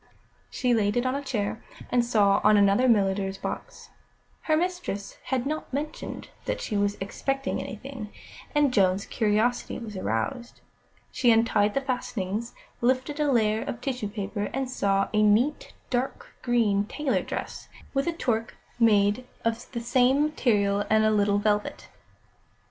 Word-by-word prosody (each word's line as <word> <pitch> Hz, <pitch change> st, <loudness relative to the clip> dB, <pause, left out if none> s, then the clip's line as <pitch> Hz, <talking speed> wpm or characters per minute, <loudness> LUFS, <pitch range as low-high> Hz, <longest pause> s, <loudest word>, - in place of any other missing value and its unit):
She 250 Hz, -1 st, 0 dB
laid 210 Hz, -1 st, +1 dB
it 245 Hz, -, +1 dB
on 255 Hz, -, +1 dB
a 280 Hz, -, -2 dB
chair, 220 Hz, -6 st, -3 dB, 0.3 s
and 245 Hz, -1 st, +3 dB
saw 205 Hz, -4 st, +3 dB
on 210 Hz, 0 st, +6 dB
another 200 Hz, +5 st, +4 dB
a -, -, +4 dB
milliner's 195 Hz, -3 st, +2 dB
box. -, -, -7 dB, 0.5 s
Her 310 Hz, -1 st, +2 dB
mistress 350 Hz, -, -3 dB
had 260 Hz, -1 st, -1 dB
not 310 Hz, +2 st, -3 dB
mentioned 300 Hz, +4 st, -5 dB, 0.2 s
that -, -, -2 dB
she 210 Hz, -, -4 dB
was 205 Hz, 0 st, +1 dB
expecting 270 Hz, +7 st, -2 dB
anything, 225 Hz, -1 st, -7 dB, 0.4 s
and 290 Hz, -3 st, +3 dB
Joan's 195 Hz, -1 st, +3 dB
curiosity 220 Hz, +2 st, 0 dB
was 225 Hz, -4 st, -7 dB
aroused. 185 Hz, -, -3 dB, 0.5 s
She 245 Hz, -, +2 dB
untied 225 Hz, -2 st, +3 dB
the 275 Hz, -, +2 dB
fastenings, 235 Hz, -4 st, -3 dB, 0.3 s
lifted 260 Hz, +4 st, +1 dB
a 295 Hz, -2 st, +2 dB
layer 220 Hz, -3 st, +2 dB
of 235 Hz, -, -5 dB
tissue 250 Hz, -4 st, -3 dB
paper, 205 Hz, 0 st, -4 dB
and 270 Hz, 0 st, -1 dB
saw 195 Hz, -5 st, +1 dB
a 215 Hz, -, +3 dB
neat, 220 Hz, +8 st, +2 dB, 0.2 s
dark 250 Hz, +1 st, -2 dB
green 220 Hz, -5 st, +2 dB
tailor 285 Hz, +4 st, -1 dB
dress, -, -, -6 dB, 0.2 s
with 275 Hz, +2 st, 0 dB
a -, -, +2 dB
toque 230 Hz, -8 st, -1 dB, 0.2 s
made 210 Hz, +1 st, +3 dB, 0.2 s
of 230 Hz, +1 st, -2 dB
the 235 Hz, -, -4 dB
same 255 Hz, +4 st, +3 dB
material 205 Hz, -9 st, +1 dB
and 220 Hz, 0 st, +4 dB
a 215 Hz, -, +4 dB
little 205 Hz, -1 st, +2 dB
velvet. 205 Hz, 0 st, -1 dB
225 Hz, 155 wpm, -26 LUFS, 205-255 Hz, 0.5 s, on